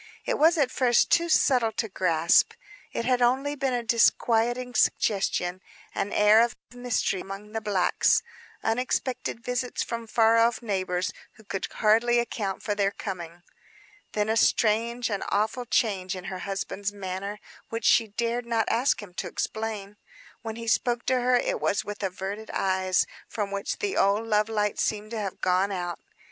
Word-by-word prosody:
It -, -, -1 dB
was 325 Hz, +3 st, +5 dB
at 275 Hz, -4 st, +2 dB
first 245 Hz, -2 st, +3 dB
too 340 Hz, 0 st, +3 dB
subtle 250 Hz, -8 st, +3 dB
to 225 Hz, -, -2 dB
grasp. 170 Hz, -4 st, +3 dB, 0.4 s
It 230 Hz, -, -3 dB
had 250 Hz, 0 st, +2 dB
only 265 Hz, +4 st, +2 dB
been 270 Hz, -3 st, -1 dB
a 240 Hz, -, -2 dB
disquieting 235 Hz, +2 st, +2 dB
suggestion; 185 Hz, -5 st, +1 dB, 0.3 s
an 205 Hz, -, -2 dB
air 210 Hz, +2 st, +6 dB
of 235 Hz, 0 st, +1 dB, 0.2 s
mystery 245 Hz, -6 st, -1 dB
among 195 Hz, +2 st, -8 dB
the 225 Hz, 0 st, -3 dB
blacks; 200 Hz, -4 st, +2 dB, 0.4 s
unexpected 250 Hz, +1 st, -1 dB
visits 250 Hz, 0 st, -2 dB
from 230 Hz, -1 st, -5 dB
far 225 Hz, +1 st, +4 dB
off 230 Hz, +1 st, +2 dB
neighbors 185 Hz, -4 st, -1 dB, 0.2 s
who 220 Hz, -, -18 dB
could 195 Hz, -2 st, -4 dB
hardly 230 Hz, +3 st, +3 dB
account 210 Hz, -5 st, -2 dB
for 210 Hz, -, -1 dB
their 200 Hz, -1 st, +1 dB
coming. 175 Hz, -4 st, -7 dB, 0.7 s
Then 210 Hz, 0 st, 0 dB
a 220 Hz, -, +1 dB
strange, 230 Hz, +2 st, +2 dB
an 200 Hz, -, -2 dB
awful 220 Hz, +4 st, -1 dB
change 195 Hz, -5 st, 0 dB
in 185 Hz, -, -7 dB
her 185 Hz, -, -5 dB
husband's 195 Hz, +1 st, -3 dB
manner, 200 Hz, +1 st, -5 dB, 0.3 s
which 230 Hz, 0 st, -4 dB
she 225 Hz, -, +5 dB
dared 235 Hz, +3 st, -2 dB
not 225 Hz, -2 st, +1 dB
ask 240 Hz, -1 st, +1 dB
him 185 Hz, -3 st, -12 dB
to -, -, -4 dB
explain. 210 Hz, -2 st, -4 dB, 0.4 s
When 225 Hz, -2 st, -5 dB
he 230 Hz, 0 st, -7 dB
spoke 240 Hz, +1 st, +1 dB
to 255 Hz, -1 st, +2 dB
her, 250 Hz, +1 st, +3 dB
it 245 Hz, -, 0 dB
was 200 Hz, -, 0 dB
with 205 Hz, 0 st, -6 dB
averted 195 Hz, +3 st, -4 dB
eyes, 185 Hz, -1 st, +1 dB, 0.2 s
from 205 Hz, -2 st, -3 dB
which 200 Hz, 0 st, -3 dB
the 405 Hz, -1 st, -2 dB
old 200 Hz, +3 st, +2 dB
love 215 Hz, -1 st, +1 dB
light 210 Hz, -2 st, -1 dB
seemed 215 Hz, 0 st, -1 dB
to 230 Hz, -, -3 dB
have 195 Hz, -3 st, -5 dB
gone 185 Hz, +2 st, +2 dB
out. 175 Hz, -2 st, -4 dB
220 Hz, 170 wpm, -26 LUFS, 195-240 Hz, 0.7 s, air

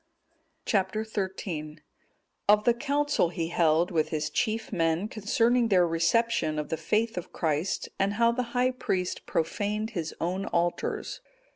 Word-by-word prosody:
Chap. 190 Hz, -1 st, +1 dB
XIII. 190 Hz, -7 st, -4 dB, 0.7 s
Of 210 Hz, 0 st, +6 dB
the 240 Hz, -, +4 dB
Council 290 Hz, -, +1 dB
he 165 Hz, -2 st, -3 dB
held 170 Hz, 0 st, +2 dB
with 160 Hz, -3 st, +1 dB
his 155 Hz, -1 st, -2 dB
chief 220 Hz, +4 st, -1 dB
men 165 Hz, +2 st, +1 dB
concerning 230 Hz, +3 st, +2 dB
their 180 Hz, -5 st, +4 dB
reception 165 Hz, 0 st, +1 dB
of 150 Hz, -, -3 dB
the -, -, 0 dB
faith 215 Hz, +6 st, 0 dB
of 175 Hz, -, -11 dB
Christ, 160 Hz, +3 st, -1 dB
and 195 Hz, +1 st, +2 dB
how 230 Hz, +2 st, +3 dB
the 245 Hz, +2 st, -1 dB, 0.2 s
high 250 Hz, +1 st, +3 dB
priest 185 Hz, -7 st, -2 dB
profaned 210 Hz, +6 st, -1 dB
his 170 Hz, -6 st, -4 dB
own 185 Hz, +3 st, -2 dB
altars. 295 Hz, -, -1 dB
195 Hz, 145 wpm, -28 LUFS, 165-225 Hz, 0.7 s, Of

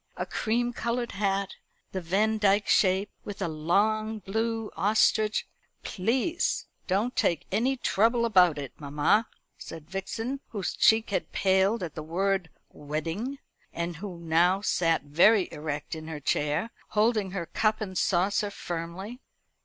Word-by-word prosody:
A -, -, -2 dB
cream 240 Hz, +2 st, -1 dB
coloured 235 Hz, 0 st, -2 dB
hat 195 Hz, -1 st, -1 dB, 0.3 s
the 190 Hz, -, -3 dB
Vandyck 205 Hz, +3 st, +2 dB
shape 190 Hz, +1 st, +3 dB
with 205 Hz, 0 st, -7 dB
a 195 Hz, -, -1 dB
long 210 Hz, +8 st, +1 dB
blue 225 Hz, +2 st, -2 dB
ostrich 215 Hz, +1 st, +2 dB, 0.2 s
" -, -, -43 dB
"Please 250 Hz, -, 0 dB, 0.2 s
don't 205 Hz, +7 st, 0 dB
take 170 Hz, -, +1 dB
any 245 Hz, +7 st, +1 dB
trouble 235 Hz, +1 st, +2 dB
about 180 Hz, -8 st, +5 dB
it, 140 Hz, -3 st, -6 dB
mamma," 150 Hz, +9 st, +2 dB, 0.3 s
said 160 Hz, -2 st, -9 dB
Vixen, 225 Hz, +7 st, -3 dB
whose 205 Hz, -5 st, -3 dB
cheek 220 Hz, -1 st, +4 dB
had 185 Hz, -3 st, -2 dB
paled 190 Hz, +3 st, +2 dB
at 165 Hz, -, -5 dB
the 155 Hz, -, -6 dB
word 185 Hz, +2 st, -1 dB, 0.2 s
"wedding," 165 Hz, -, -4 dB, 0.4 s
and 170 Hz, 0 st, -3 dB
who 190 Hz, -1 st, -7 dB
now 170 Hz, +3 st, +2 dB
sat 165 Hz, -6 st, +1 dB
very 180 Hz, +8 st, +4 dB
erect 150 Hz, -1 st, -5 dB
in 160 Hz, -1 st, -6 dB
her 160 Hz, -2 st, -5 dB
chair, 150 Hz, +9 st, 0 dB, 0.3 s
holding 215 Hz, -2 st, +3 dB
her 180 Hz, -2 st, -4 dB
cup 215 Hz, +5 st, 0 dB
and 195 Hz, -4 st, -5 dB
saucer 195 Hz, +4 st, +1 dB
firmly. 185 Hz, +7 st, -6 dB
195 Hz, 140 wpm, -28 LUFS, 170-220 Hz, 0.4 s, about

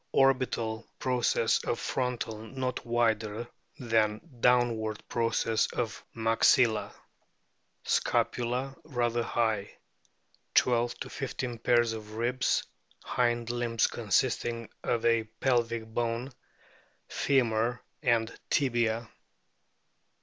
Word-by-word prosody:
Orbital 125 Hz, -4 st, +2 dB
pro 125 Hz, -1 st, -1 dB
cess 115 Hz, -1 st, +2 dB
of 120 Hz, -, -1 dB
frontal 125 Hz, -4 st, -2 dB
not 125 Hz, +3 st, -4 dB
wider 115 Hz, -1 st, 0 dB, 0.3 s
than 110 Hz, -3 st, +1 dB, 0.2 s
downward 115 Hz, -3 st, +2 dB
process 115 Hz, -1 st, +1 dB
of 115 Hz, -4 st, -3 dB
maxilla. 115 Hz, 0 st, +3 dB, 0.9 s
Scapula 125 Hz, +3 st, 0 dB
rather 120 Hz, -5 st, 0 dB
high; 110 Hz, -3 st, -1 dB, 0.8 s
12 120 Hz, -1 st, +3 dB
15 125 Hz, -3 st, -4 dB
pairs 120 Hz, -1 st, +3 dB
of 110 Hz, -1 st, -8 dB
ribs, 120 Hz, +3 st, +1 dB, 0.4 s
hind 120 Hz, -1 st, 0 dB
limb 120 Hz, -1 st, -3 dB
consisting 115 Hz, +1 st, +1 dB
of 115 Hz, -, 0 dB
a 115 Hz, -1 st, +3 dB
pelvic 115 Hz, -3 st, +1 dB
bone, 115 Hz, +3 st, -2 dB, 0.8 s
femur, 120 Hz, -3 st, +1 dB, 0.2 s
and 115 Hz, -4 st, +2 dB, 0.2 s
tibia. 120 Hz, -4 st, +1 dB
120 Hz, 90 wpm, -29 LUFS, 115-125 Hz, 0.9 s, maxilla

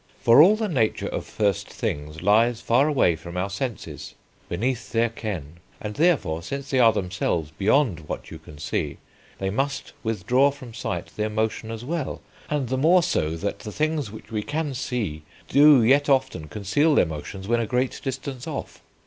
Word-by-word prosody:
For 120 Hz, +5 st, +7 dB
all 190 Hz, +7 st, +7 dB
the 220 Hz, 0 st, -1 dB
nature 125 Hz, -, 0 dB
of -, -, -4 dB
first 100 Hz, -3 st, 0 dB
things 75 Hz, +3 st, -4 dB
lies 115 Hz, +4 st, +4 dB
far 125 Hz, +5 st, +3 dB
away 130 Hz, -, +3 dB
from 85 Hz, +2 st, -8 dB
our 95 Hz, +2 st, -1 dB
senses, 115 Hz, +2 st, -5 dB, 0.3 s
beneath 120 Hz, +7 st, -2 dB
their 115 Hz, 0 st, +2 dB
ken; 95 Hz, -9 st, -6 dB, 0.2 s
and, 105 Hz, 0 st, -5 dB
therefore, 105 Hz, -, +2 dB
since 140 Hz, +9 st, -5 dB
they 130 Hz, -, +2 dB
are 115 Hz, -2 st, +7 dB
themselves 90 Hz, -6 st, -2 dB
beyond 95 Hz, -, +1 dB
what -, -, -5 dB
you -, -, -8 dB
can 75 Hz, -, -13 dB
see, 75 Hz, -, -3 dB, 0.4 s
they 95 Hz, 0 st, -2 dB
must 135 Hz, +5 st, -2 dB
withdraw 125 Hz, +4 st, +2 dB
from 130 Hz, -4 st, -10 dB
sight 115 Hz, -, -4 dB
their 105 Hz, 0 st, 0 dB
motion 110 Hz, +1 st, -2 dB
as 115 Hz, +1 st, -6 dB
well; 155 Hz, -1 st, -3 dB, 0.3 s
and 145 Hz, -5 st, -1 dB
the 130 Hz, 0 st, 0 dB
more 170 Hz, +5 st, +5 dB
so, 80 Hz, -, 0 dB
that 100 Hz, +4 st, -3 dB
the 105 Hz, -, -7 dB
things 155 Hz, -2 st, -1 dB
which 110 Hz, +2 st, -12 dB
we 110 Hz, -1 st, -1 dB
can 145 Hz, +4 st, -2 dB
see 115 Hz, -, -3 dB, 0.3 s
do 145 Hz, -2 st, +7 dB
yet 140 Hz, +5 st, +4 dB
often 130 Hz, -, +1 dB
conceal 105 Hz, -, +1 dB
their -, -, +5 dB
motions 85 Hz, +5 st, -7 dB
when 120 Hz, +1 st, +2 dB
a 115 Hz, -, -1 dB
great 125 Hz, +2 st, -1 dB
distance 135 Hz, -1 st, -5 dB
off. -, -, -6 dB
115 Hz, 185 wpm, -24 LUFS, 95-140 Hz, 0.4 s, For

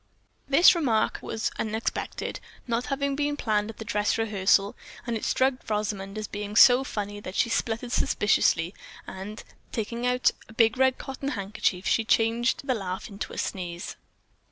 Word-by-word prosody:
This 290 Hz, +6 st, +7 dB
remark 260 Hz, -11 st, +1 dB
was 220 Hz, -, -2 dB
unexpected, 220 Hz, +1 st, -3 dB, 0.3 s
not 235 Hz, 0 st, -1 dB
having 280 Hz, 0 st, -1 dB
been 290 Hz, 0 st, -1 dB
planned 215 Hz, -4 st, 0 dB
at 225 Hz, -, -9 dB
the 220 Hz, -, -7 dB
dress 210 Hz, 0 st, 0 dB
rehearsal, 205 Hz, -1 st, +2 dB, 0.3 s
and 235 Hz, -1 st, -2 dB
it 220 Hz, -, -4 dB
struck 265 Hz, +1 st, +2 dB, 0.2 s
Rosamond 205 Hz, -1 st, -2 dB
as 215 Hz, -1 st, -4 dB
being 205 Hz, 0 st, -6 dB
so 250 Hz, +3 st, +8 dB
funny 205 Hz, -4 st, -4 dB
that 190 Hz, -2 st, -8 dB
she -, -, +2 dB
sputtered 230 Hz, +2 st, -1 dB
suspiciously, 185 Hz, -7 st, +2 dB, 0.3 s
then 195 Hz, +3 st, -7 dB, 0.3 s
taking 235 Hz, +2 st, -2 dB
out 250 Hz, 0 st, +3 dB, 0.2 s
a -, -, -12 dB
big 225 Hz, +2 st, +3 dB
red 260 Hz, -1 st, +4 dB
cotton 270 Hz, +1 st, -5 dB
handkerchief, 200 Hz, -5 st, -2 dB
she 225 Hz, -, +2 dB
changed 230 Hz, +4 st, +1 dB
the 265 Hz, -, +1 dB
laugh 190 Hz, -2 st, -4 dB
into 200 Hz, 0 st, -6 dB
a -, -, -8 dB
sneeze. 175 Hz, -2 st, -4 dB
220 Hz, 160 wpm, -27 LUFS, 205-250 Hz, 0.3 s, so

